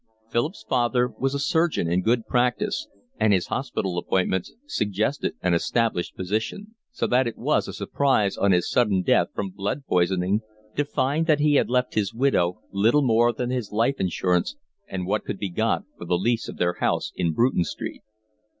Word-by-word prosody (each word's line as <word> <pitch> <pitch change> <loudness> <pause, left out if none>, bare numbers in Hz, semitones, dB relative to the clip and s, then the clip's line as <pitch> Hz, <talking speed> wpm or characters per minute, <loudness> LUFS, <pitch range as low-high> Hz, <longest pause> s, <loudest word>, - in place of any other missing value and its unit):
Philip's 110 -2 -1
father 125 0 +2
was 135 +2 0
a - - -1
surgeon 160 - +1
in 85 +2 +1
good 115 +3 +1
practice, 200 - 0 0.3
and 110 - +4
his 95 -3 +2
hospital 100 -9 -2
appointments 95 0 0
suggested 110 - -1
an 90 -1 +2
established 110 +1 0
position; 110 - -3 0.2
so 240 - -2
that 125 0 +2
it 115 - -5
was - - +1
a - - -6
surprise 120 -9 +1
on 100 - +2
his 90 -1 +2
sudden 105 -7 +2
death - - +3
from 100 -2 -3
blood 100 +8 -3
poisoning 90 +2 +1 0.3
to 145 - +1
find 145 +4 0
that 155 -3 +4
he 150 0 +3
had 140 - +3
left 125 0 +1
his 105 -1 -1
widow 115 -9 +1
little 115 +9 +3
more 120 -1 +4
than 120 +2 -3
his 125 -5 -3
life 115 +6 +1
insurance 90 - 0 0.3
and 90 -1 -4
what 105 +3 0
could 100 - -4
be 100 - -3
got - - 0 0.2
for - - -7
the 90 +1 +1
lease 115 +5 0
of - - -8
their 90 0 +1
house - - 0
in 85 - 0
Bruton 115 +1 +2
Street. - - -6
110 Hz, 185 wpm, -24 LUFS, 95-130 Hz, 0.3 s, and